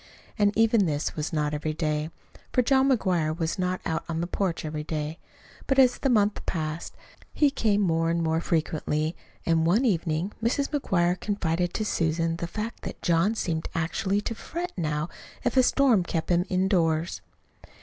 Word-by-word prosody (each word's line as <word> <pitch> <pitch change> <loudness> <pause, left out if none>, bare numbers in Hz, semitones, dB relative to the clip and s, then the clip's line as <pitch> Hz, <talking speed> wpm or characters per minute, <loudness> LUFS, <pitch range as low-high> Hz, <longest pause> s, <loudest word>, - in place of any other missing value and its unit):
And 205 -2 +3
even 225 -3 +4
this 145 -1 -2
was 150 0 -3
not 150 -2 0
every 155 +1 -2
day, 155 -1 -1 0.4
for 250 - +3
John 265 +2 +4
McGuire 175 - +1
was 165 +2 -2
not 185 0 0
out 160 - -1
on 165 -1 -2
the 170 - 0
porch 180 -2 -2
every 150 0 -4
day. 155 +1 -4 0.5
But 270 - +1
as 255 -2 +5
the 270 - +1
month 210 -4 +2
passed, 155 -1 -3 0.4
he 290 -2 +3
came 210 -6 +1
more 165 -3 +2
and 170 0 0
more 160 0 +1
frequently, 155 -1 -1 0.3
and 165 -1 +3
one 195 +11 +3
evening 170 -3 0
Mrs. 255 +5 +1
McGuire 180 - +1
confided 175 -4 -1
to 215 - -1
Susan 165 -2 0
the 170 - -3
fact 215 +6 -5
that - - -7
John 170 +6 +2
seemed 160 -6 -2
actually 190 +5 0
to 230 - -3
fret 345 +9 -5
now 155 -3 -1 0.4
if 245 0 0
a 260 - +7
storm 250 -6 +4
kept 170 0 -2
him 175 +1 +3
indoors. 175 -3 +1
175 Hz, 175 wpm, -26 LUFS, 160-210 Hz, 0.5 s, a